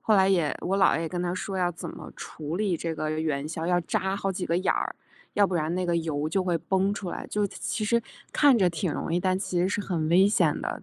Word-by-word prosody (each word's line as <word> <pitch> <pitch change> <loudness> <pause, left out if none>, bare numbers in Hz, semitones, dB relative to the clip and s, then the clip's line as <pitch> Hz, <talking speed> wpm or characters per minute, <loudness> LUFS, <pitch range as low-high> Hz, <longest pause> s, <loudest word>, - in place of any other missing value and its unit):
后 215 - +3
来 190 -1 +5
也 170 -7 +2
我 195 +2 0
姥 190 - +5
爷 165 - 0
也 165 - -2
跟 175 +1 -3
她 175 0 -1
说 195 +1 -4
要 175 -1 +1
怎 170 - -7
么 - - -10
处 155 +2 -6
理 195 -4 +1
这 165 0 -3
个 155 -1 -2
元 155 -2 -1
宵， 165 0 -4
要 175 0 +3
扎 190 +3 -1
好 195 -1 -1
几 180 0 -3
个 170 - +1
眼 185 - +2
儿， - - -2 0.4
要 205 -1 +5
不 185 - -3
然 155 0 0
那 185 0 -1
个 175 - +1
油 155 -2 -1
就 190 +3 +1
会 175 -2 +1
崩 190 +3 +1
出 195 -4 -5
来， - - -5
就 210 -1 0
其 215 +2 -3
实 235 +2 +2 0.3
看 285 -4 +5
着 185 -4 +4
挺 165 +1 -2
容 - - -3
易， 175 - +2
但 185 0 +1
其 185 -2 -1
实 180 - +2
是 205 - -1
很 165 -5 -1
危 185 +4 +6
险 205 - +2
的 - - -4
180 Hz, 295 characters per minute, -27 LUFS, 165-195 Hz, 0.4 s, 危